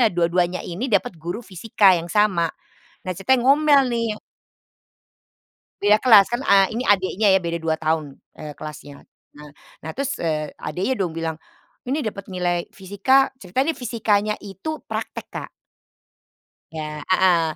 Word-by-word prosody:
eh, 230 Hz, -, +5 dB
dua-duanya 175 Hz, 0 st, 0 dB
ini 190 Hz, +10 st, -4 dB
dapat 200 Hz, -4 st, +1 dB
guru 175 Hz, +8 st, -5 dB
fisika 195 Hz, +1 st, +3 dB
yang 170 Hz, -, -8 dB
sama. 185 Hz, -5 st, +2 dB, 0.6 s
Nah, 185 Hz, -, -2 dB
ceritanya 245 Hz, +7 st, +1 dB
ngomel 285 Hz, +1 st, +5 dB
nih. 230 Hz, -1 st, -1 dB, 1.7 s
Beda 210 Hz, +1 st, +5 dB
kelas, 215 Hz, -4 st, +6 dB
kan, 240 Hz, +3 st, -3 dB
eee, 195 Hz, +2 st, +4 dB
ini 250 Hz, -, -2 dB
adiknya 195 Hz, +1 st, +2 dB
ya, 190 Hz, -, +4 dB
beda 170 Hz, -1 st, -3 dB
2 160 Hz, -1 st, -1 dB
tahun, 155 Hz, -3 st, -2 dB, 0.2 s
eee, 150 Hz, -1 st, -8 dB
kelasnya. 145 Hz, -1 st, -10 dB, 0.3 s
Nah 150 Hz, 0 st, -13 dB, 0.3 s
nah 160 Hz, -, -7 dB
terus, 275 Hz, 0 st, -3 dB
eee, 155 Hz, -2 st, -2 dB
adiknya 185 Hz, -, -2 dB
dong 170 Hz, -4 st, -2 dB
bilang, 160 Hz, -1 st, -4 dB, 0.5 s
"Ini 280 Hz, +1 st, -1 dB
dapet 200 Hz, -2 st, -6 dB
nilai 175 Hz, -2 st, -2 dB
fisika," 205 Hz, +9 st, +1 dB
ceritanya 260 Hz, -, -1 dB
nih -, -, -14 dB
fisikanya 215 Hz, -3 st, 0 dB
itu 200 Hz, +11 st, -5 dB
praktek, -, -, -5 dB
Kak. -, -, -6 dB, 1.2 s
Iya, 150 Hz, -1 st, -6 dB
heeh. 185 Hz, -3 st, +4 dB
190 Hz, 145 wpm, -22 LUFS, 170-225 Hz, 1.7 s, kelas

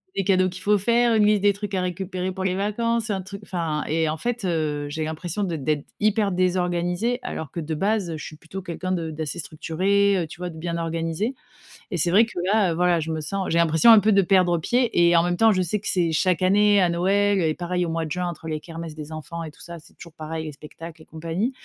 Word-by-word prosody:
des 195 Hz, -, 0 dB
cadeaux 185 Hz, -1 st, +3 dB
qu'il 180 Hz, +1 st, -10 dB
faut 210 Hz, 0 st, +4 dB
faire, 235 Hz, +3 st, +3 dB
une 215 Hz, -1 st, +4 dB
liste 210 Hz, -2 st, +3 dB
des 205 Hz, -1 st, +5 dB
trucs 205 Hz, 0 st, -6 dB
à 185 Hz, -, 0 dB
récupérer 185 Hz, +1 st, -3 dB
pour 190 Hz, 0 st, -5 dB
les 185 Hz, -1 st, 0 dB
vacances, 220 Hz, +3 st, -1 dB
un 190 Hz, -2 st, -1 dB
truc 200 Hz, +2 st, -9 dB
enfin 165 Hz, -6 st, -2 dB
et 160 Hz, 0 st, +1 dB
en 155 Hz, -, -2 dB
fait, 240 Hz, +4 st, -3 dB
heu, 155 Hz, -5 st, -1 dB
j'ai 155 Hz, +2 st, -3 dB
l'impression 165 Hz, +5 st, -3 dB
de 175 Hz, -4 st, -2 dB
d'être 150 Hz, 0 st, -1 dB
hyper 210 Hz, -1 st, +2 dB
désorganisée. 180 Hz, +5 st, 0 dB
Alors 160 Hz, -, -6 dB
que 170 Hz, -, -5 dB
de 160 Hz, 0 st, -3 dB
base, 200 Hz, +2 st, 0 dB
heu, 160 Hz, -, -4 dB
je -, -, -7 dB
suis 155 Hz, -, -9 dB
plutôt 165 Hz, +5 st, -8 dB
quelqu'un 185 Hz, +1 st, -4 dB
de 165 Hz, -3 st, -2 dB
d'assez 155 Hz, +1 st, -5 dB
structurée, 190 Hz, +6 st, +1 dB
heu, 175 Hz, -, 0 dB
tu 170 Hz, -, -12 dB
vois 180 Hz, -, -3 dB
de 160 Hz, -, -10 dB
bien 170 Hz, +1 st, -3 dB
organisée 165 Hz, +8 st, -2 dB, 0.6 s
et 175 Hz, -, -1 dB
c'est 170 Hz, +2 st, +1 dB
vrai 205 Hz, +6 st, +6 dB
que 225 Hz, -6 st, -7 dB
là, 200 Hz, -2 st, +3 dB
heu, -, -, -2 dB
voilà 175 Hz, 0 st, +2 dB
je 160 Hz, +1 st, -3 dB
me 160 Hz, -, -2 dB
sens 190 Hz, +5 st, -3 dB
j'ai 165 Hz, -, +2 dB
l'impression 170 Hz, +7 st, +5 dB
un 220 Hz, -, +9 dB
peu 215 Hz, 0 st, +3 dB
de 195 Hz, -, +5 dB
perdre 180 Hz, -2 st, +3 dB
pied 225 Hz, -1 st, +2 dB
et 170 Hz, -, +4 dB
en 165 Hz, -, +4 dB
même 175 Hz, 0 st, 0 dB
temps 225 Hz, +4 st, +5 dB
je 185 Hz, -, +1 dB
sais 185 Hz, +4 st, -1 dB
que -, -, -7 dB
c'est 170 Hz, -3 st, +1 dB
chaque 180 Hz, +3 st, +1 dB
année 205 Hz, +2 st, +4 dB
à 180 Hz, -, +4 dB
Noël 195 Hz, +3 st, +2 dB
et 160 Hz, -2 st, +1 dB
pareil 180 Hz, +1 st, -2 dB
au -, -, -3 dB
mois 165 Hz, 0 st, -2 dB
de 155 Hz, -, -8 dB
juin. 180 Hz, +2 st, -1 dB
Entre 165 Hz, -2 st, -7 dB
les 155 Hz, -1 st, -3 dB
kermesses 165 Hz, -1 st, -8 dB
des 155 Hz, 0 st, -8 dB
enfants 160 Hz, +2 st, -6 dB
et 155 Hz, -, -7 dB
tout -, -, -20 dB
ça, 170 Hz, 0 st, -8 dB
c'est 160 Hz, -, -20 dB
toujours 170 Hz, -3 st, -13 dB
pareil 160 Hz, 0 st, -5 dB
les 155 Hz, -, -6 dB
spectacles 155 Hz, +2 st, -11 dB
et -, -, -15 dB
compagnie 165 Hz, +9 st, -3 dB
175 Hz, 265 wpm, -24 LUFS, 160-200 Hz, 0.6 s, un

